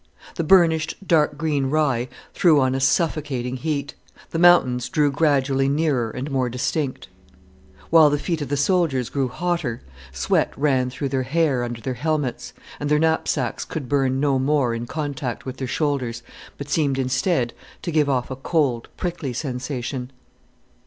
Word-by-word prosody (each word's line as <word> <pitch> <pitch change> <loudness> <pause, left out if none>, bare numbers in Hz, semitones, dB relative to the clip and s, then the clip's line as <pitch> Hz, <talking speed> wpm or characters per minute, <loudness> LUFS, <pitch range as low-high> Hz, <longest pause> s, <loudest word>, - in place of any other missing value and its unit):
The - - -2
burnished, 160 -2 +4
dark 150 -3 +3
green 150 -3 0
rye 135 -4 +1 0.2
threw 165 -6 +4
on 130 -1 +2
a 135 - -1
suffocating 135 -3 0
heat, 140 -1 -3 0.4
the 165 - -2
mountains 150 -9 +4
drew 150 -2 +2
gradually 135 -2 +2
nearer 140 -6 +1
and 130 +6 -5
more 130 -2 0
distinct. 130 +3 -2 0.8
While 160 -2 +7
the 145 - +1
feet 165 +1 -2
of 145 - -4
the 145 - 0
soldiers 145 -5 +1
grew 135 -2 0
hotter, 170 -5 -2 0.3
sweat 65 0 +1
ran 135 -3 +2
through 135 +2 -4
their 130 -1 0
hair 135 -1 +1
under 120 -1 -5
their 130 +3 -3
helmets, 145 0 -2 0.3
and 145 - -2
their 150 - +4
knapsacks 155 -5 0
could 145 -6 -6
burn 135 -1 +1
no 140 -2 +2
more 135 -3 +1
in 115 +1 -4
contact 140 -4 -4
with 130 0 -6
their 130 - -4
shoulders, 125 -5 -1 0.3
but 140 - -7
seemed 145 -2 +1
instead 135 0 0 0.3
to 170 - -2
give 150 -2 +2
off 130 -1 -1
a - - -3
cold, 135 -4 0
prickly 170 -7 -3
sensation. 125 -1 -4
140 Hz, 160 wpm, -22 LUFS, 130-155 Hz, 0.8 s, While